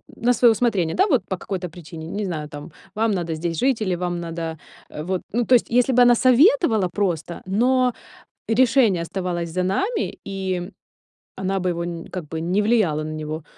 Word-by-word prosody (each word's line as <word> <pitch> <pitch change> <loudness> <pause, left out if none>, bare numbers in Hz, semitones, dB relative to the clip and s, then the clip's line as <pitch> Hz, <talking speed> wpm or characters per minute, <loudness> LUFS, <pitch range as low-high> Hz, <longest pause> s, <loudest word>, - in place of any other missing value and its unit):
на 245 +2 +2
своё 240 0 +5
усмотрение, 205 -8 0
да, 390 - +3
вот 265 - +2
по 190 - -3
какой-то 180 -1 -5
причине, 160 -1 -10
не 205 +4 -3
знаю: 155 -5 -4
там 145 +2 -9 0.2
вам 225 +1 +1
надо 170 -4 -2
здесь 165 +1 -3
жить 260 -4 +1
или 185 -4 0
вам 175 0 -3
надо, 165 -1 -5 0.3
э, 150 - -7
вот. 185 +1 -2
Ну 235 +2 0
то 255 - +5
есть 240 - +2
если 245 +2 +3
бы 250 - +5
она 245 0 +7
советовала 255 - +4
просто, 175 -4 -2
но 250 +5 +2 0.6
решение 230 -6 +3
оставалось 175 -1 -3
за 180 +3 -1
нами 390 - -1
и 190 -1 -3 0.7
она 190 0 -1
бы 185 - -1
его 170 0 -2
не 170 -1 -6
как 175 -5 -6
бы 160 - -5
не 180 +5 +1
влияла 205 -9 +2
на 155 - -5
него, 155 0 -5
185 Hz, 195 wpm, -22 LUFS, 170-235 Hz, 0.7 s, она